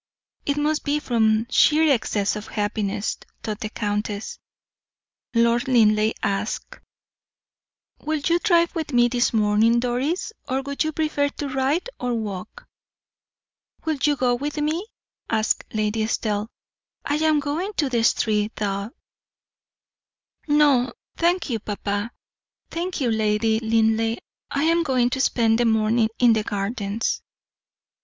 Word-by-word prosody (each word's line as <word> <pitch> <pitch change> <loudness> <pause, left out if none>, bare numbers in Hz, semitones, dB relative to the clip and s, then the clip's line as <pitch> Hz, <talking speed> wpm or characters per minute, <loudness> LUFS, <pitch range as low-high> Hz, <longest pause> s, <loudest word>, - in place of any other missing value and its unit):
"It 285 0 +1
must 300 +1 0
be 290 +1 0
from 220 -4 +2
sheer 310 +1 +5
excess 210 -4 0
of 210 0 -6
happiness," 205 -1 -2 0.3
thought 215 -1 -4
the 215 - -4
countess. 210 0 -3 1.0
Lord 235 +1 +3
Linleigh 215 -3 +4
asked: 200 +2 -2 1.2
"Will 310 +1 -1
you 335 +4 +1
drive 340 -4 +3
with 320 -5 -4
me 240 0 +4
this 240 0 +1
morning, 220 +2 +3
Doris, 260 - -1 0.2
or 265 +1 0
would 280 +2 -1
you 310 - -1
prefer 305 -2 0
to 285 0 -5
ride 270 - 0
or 245 -1 -1
walk?" 215 - -6 1.2
"Will 315 -3 -1
you 295 -1 +3
go 250 -2 +1
with 290 +5 -3
me?" 310 +7 -1 0.4
asked 220 -1 +1
Lady 215 0 -1
Estelle. 215 -1 -1 0.6
"I 290 - 0
am 310 -1 +3
going 300 +8 -2
to 310 - 0
Streathaw." 210 -3 0 1.6
"No, 290 -4 +3 0.2
thank 345 +1 +1
you, 235 -5 -2
papa. 205 +1 -3 0.6
Thank 345 0 -3
you, 245 -3 +1
Lady 220 0 +1
Linleigh. 225 0 +1 0.3
I 280 - -1
am 335 +1 +3
going 255 -5 +1
to 265 - 0
spend 225 -3 +2
the 240 - +3
morning 220 0 +2
in 240 -2 +5
the 220 - +1
gardens." 205 +1 -2
240 Hz, 130 wpm, -23 LUFS, 215-295 Hz, 1.6 s, sheer